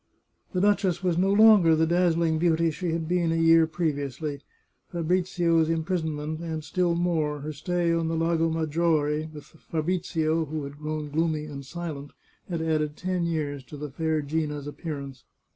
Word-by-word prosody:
The 180 - +1
duchess 200 -3 +2
was 180 -2 +2
no 190 +3 +2
longer 205 -6 +7
the 160 +1 +3
dazzling 170 -1 +2
beauty 165 -1 +2
she 175 +3 -3
had 165 -1 -2
been 175 -1 +1
a - - +1
year 165 0 +5
previously. 145 -3 -3 0.5
Fabrizio's 170 -1 +1
impris 165 +2 0
onment, 155 0 -3
and 160 -2 -4
still 175 +2 0
more, 160 -4 0
her 155 +2 -5
stay 170 +3 0
on 165 -1 0
the 165 - -1
Lago 165 0 +1
Maggiore 155 -1 0
with 150 -2 -12
the 160 - -21
Fabrizio 165 -1 -1
who 155 0 -4
had 140 +1 -8
grown 155 -1 -4
gloomy 155 0 0
and 140 -2 -7
silent, 145 -1 -6 0.4
had 170 -2 -2
added 155 -2 0
ten 180 -1 -1
years 145 -4 -2
to 145 - -10
the 150 -1 -6
fair 160 +1 -1
Gina's 150 -1 -2
appearance. 145 -3 -6
160 Hz, 170 wpm, -26 LUFS, 150-170 Hz, 0.5 s, longer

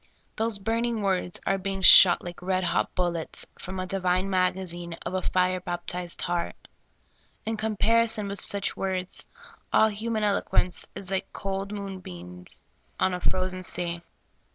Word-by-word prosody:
Those 225 -1 0
burning 225 +2 -1
words 185 -2 -1
are 195 - +1
being 195 0 -4
shot 185 -1 +9
like 175 0 -8
red 185 0 -1
hot - - -1
bullets 175 -3 -2
from 190 +1 -7
a 185 - -2
divine 185 0 -1
magazine 180 -2 -1
of - - -4
a 185 - -1
flre 185 0 0
baptized 175 0 -3
heart. 175 -1 -2 0.9
In 225 - -1
comparison 220 0 +2
with 200 0 +1
such 200 -1 +5
words, 185 -1 -3 0.4
all 220 - +5
human 215 +1 -3
eloquence 200 -3 +1
is 195 -2 -4
like 190 - -2
cold 195 0 -4
moonbeams 90 - -8 0.3
on 185 - +2
a 180 - -3
frozen 185 +1 -1
sea. 170 -1 -3
185 Hz, 145 wpm, -26 LUFS, 180-200 Hz, 0.9 s, shot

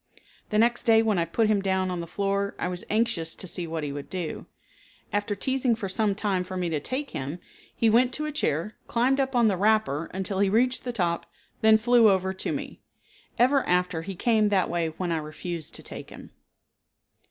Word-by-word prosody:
The 210 - 0
next 235 +2 +2
day 225 -1 +5
when 215 -5 +1
I 165 - +1
put 220 +7 +1
him 210 -2 +2
down 190 -1 0
on 180 - -3
the 170 - -5
floor 200 +2 -1
I - - -2
was 180 0 -4
anxious 210 -7 0
to - - -7
see 175 0 -3
what 160 -1 -3
he 145 - -3
would 140 0 -7
do. 180 -4 -5 0.7
After 205 0 0
teasing 260 +2 +1
for 215 -3 -4
some 200 +1 0
time 195 -3 0
for 185 0 -6
me 180 -2 -1
to 155 -2 -1
take 260 - -4
him, 140 +5 -4 0.4
he 230 - +2
went 240 +3 +4
to 305 - -3
a 305 - -3
chair, 210 - -1
climbed 255 +4 +2
up 270 -1 0
on 235 -2 +5
the 195 -3 +1
wrapper 205 -7 +1
until 190 +1 -3
he 200 -1 +3
reached 245 +6 +1
the 245 - -1
top, 175 -7 -1 0.3
then 220 0 +6
flew 235 0 +5
over 190 -1 +1
to 190 - -3
me. - - -5 0.6
Ever 265 +3 +4
after 180 -2 +1
he 190 +3 -6
came 215 +1 +2
that 190 -4 +1
way 170 -1 0
when 170 +2 -4
I 165 - +1
refused 155 +1 -6
to - - -10
take - - -9
him. - - -12
200 Hz, 215 wpm, -26 LUFS, 175-225 Hz, 0.7 s, then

